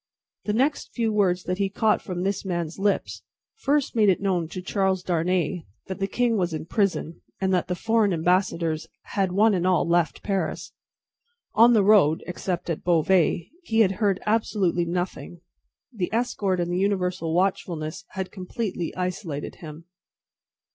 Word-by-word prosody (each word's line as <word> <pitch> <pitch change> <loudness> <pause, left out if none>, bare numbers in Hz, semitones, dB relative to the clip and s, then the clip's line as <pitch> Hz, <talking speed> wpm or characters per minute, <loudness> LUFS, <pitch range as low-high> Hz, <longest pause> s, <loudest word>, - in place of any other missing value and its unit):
The 260 +8 +1
few 225 -3 0
words 185 -4 +2
that 180 +1 -3
he 195 -1 +1
caught 215 +2 +1
from 180 -2 -4
this 195 +1 -1
man's 175 -3 -3
lips, 200 0 0 0.4
first 290 - 0
made 215 -3 +4
it 185 - +3
known 185 -4 0
to 185 - -7
Charles 190 0 0
Darnay 175 0 0 0.2
that 190 +1 -6
the 195 - 0
king 240 +1 +1
was 175 -4 0
in 155 - -5
prison, 185 -4 -1 0.2
and 190 -1 +1
that 180 -1 +1
the 180 - -1
foreign 225 +1 +2
ambassadors 165 -2 0 0.3
had 195 -3 +1
one 210 +4 +4
and 180 -1 +1
all 185 -2 +2
left 170 -1 +1
Paris. 195 -2 -2 0.8
On 235 +2 +6
the 215 -3 +4
road 190 -7 +4
(except 180 0 -4
at 165 -3 -3
Beauvais) 170 0 +2
he 225 -10 +1
had 195 -4 +4
heard 200 -3 +2
absolutely 205 -5 +1
nothing. 175 0 -4 0.5
The 190 -6 -3
escort 220 -5 0
and 175 0 -1
the 180 - 0
universal 180 -4 0
watchfulness 175 -4 -1
had 190 -1 -4
completely 185 -2 -4
isolated 180 -5 -4
him. 160 0 -10
185 Hz, 160 wpm, -25 LUFS, 175-205 Hz, 0.8 s, On